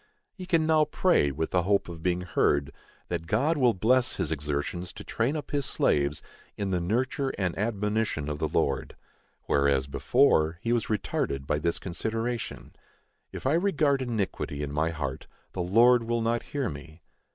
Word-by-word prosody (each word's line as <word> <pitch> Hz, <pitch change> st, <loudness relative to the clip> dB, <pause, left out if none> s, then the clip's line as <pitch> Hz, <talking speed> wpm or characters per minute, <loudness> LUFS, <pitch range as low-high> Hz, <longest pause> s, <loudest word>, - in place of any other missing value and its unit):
He 185 Hz, -3 st, -9 dB
can 165 Hz, -4 st, +2 dB
now 155 Hz, -1 st, +4 dB
pray, 150 Hz, -, +2 dB
with 80 Hz, +4 st, -3 dB
the 90 Hz, -, +3 dB
hope 100 Hz, +3 st, +1 dB
of 85 Hz, -2 st, -8 dB
being 90 Hz, +1 st, 0 dB
heard, 70 Hz, -5 st, +1 dB, 0.4 s
that 80 Hz, -, -3 dB
God 135 Hz, -, +2 dB
will 125 Hz, -6 st, +3 dB
bless 120 Hz, +6 st, +2 dB
his -, -, -2 dB
exertions 75 Hz, +5 st, -3 dB
to 105 Hz, -, -9 dB
train 120 Hz, +8 st, -1 dB
up 150 Hz, -, -5 dB
his 140 Hz, -4 st, 0 dB
slaves 70 Hz, 0 st, +1 dB, 0.3 s
"in 100 Hz, -2 st, -2 dB
the 90 Hz, -, +1 dB
nurture 130 Hz, +8 st, 0 dB
and 90 Hz, -3 st, -1 dB
admonition 105 Hz, -6 st, -1 dB
of 75 Hz, -1 st, -3 dB
the -, -, 0 dB
Lord:" 70 Hz, -1 st, -1 dB, 0.5 s
whereas, 70 Hz, -2 st, +2 dB
before, 80 Hz, +3 st, +2 dB
he 115 Hz, +1 st, 0 dB
was 120 Hz, -, 0 dB
retarded 70 Hz, -10 st, -2 dB
by 75 Hz, -, 0 dB
this 85 Hz, +2 st, 0 dB
consideration,—"If 115 Hz, +10 st, -6 dB
I 135 Hz, -, +3 dB
regard 155 Hz, -6 st, +2 dB
iniquity 100 Hz, -, -2 dB
in 70 Hz, -, -4 dB
my 80 Hz, +3 st, 0 dB
heart, 70 Hz, -5 st, -4 dB, 0.2 s
the 90 Hz, -, -4 dB
Lord 115 Hz, +6 st, +5 dB
will 120 Hz, 0 st, 0 dB
not 115 Hz, +1 st, 0 dB
hear 140 Hz, -3 st, -1 dB
me." 75 Hz, +3 st, -9 dB
100 Hz, 170 wpm, -27 LUFS, 80-125 Hz, 0.5 s, Lord